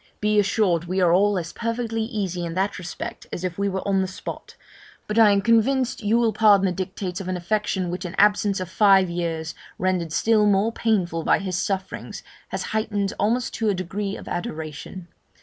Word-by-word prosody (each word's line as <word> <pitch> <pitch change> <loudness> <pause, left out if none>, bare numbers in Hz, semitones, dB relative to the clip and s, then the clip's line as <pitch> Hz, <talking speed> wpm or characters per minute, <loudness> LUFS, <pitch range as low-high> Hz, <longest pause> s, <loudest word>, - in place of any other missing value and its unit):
Be 210 0 +2
assured 195 -4 +1
we 185 +2 -1
are 175 -2 +4
all 200 +2 +3
as 170 -2 -4
perfectly 230 -1 -2
easy 200 -6 -3
in 165 -1 -4
that 195 +1 -1
respect 175 - -7
as 175 - -5
if 180 0 -3
we 200 0 +1
were 190 0 -4
on 195 -1 +2
the 190 - -1
spot; 190 - -8 0.5
but 210 +2 0
I 220 -2 +8
am 200 -1 +2
convinced 235 +4 +2
you 215 +2 +2
will 230 -2 +2
pardon 205 -3 +5
the 185 - +1
dictates 185 0 -4
of 185 - -7
an 185 -1 -1
affection 190 -1 -1
which 180 +2 -4
an 180 - -6
absence 205 -1 +3
of 185 - -4
five 190 -1 +4
years, 165 -2 -3 0.2
rendered 180 -3 -1
still 215 +4 +3
more 205 +2 +3
painful 185 -8 0
by - - +4
his 190 -3 -3
sufferings, 190 -1 -4 0.2
has - - -4
heightened 210 -2 -1
almost 235 +4 0
to 220 -2 0
a 200 - +1
degree 195 +3 -4
of - - -11
adoration. 160 +1 -6
195 Hz, 200 wpm, -23 LUFS, 180-210 Hz, 0.5 s, I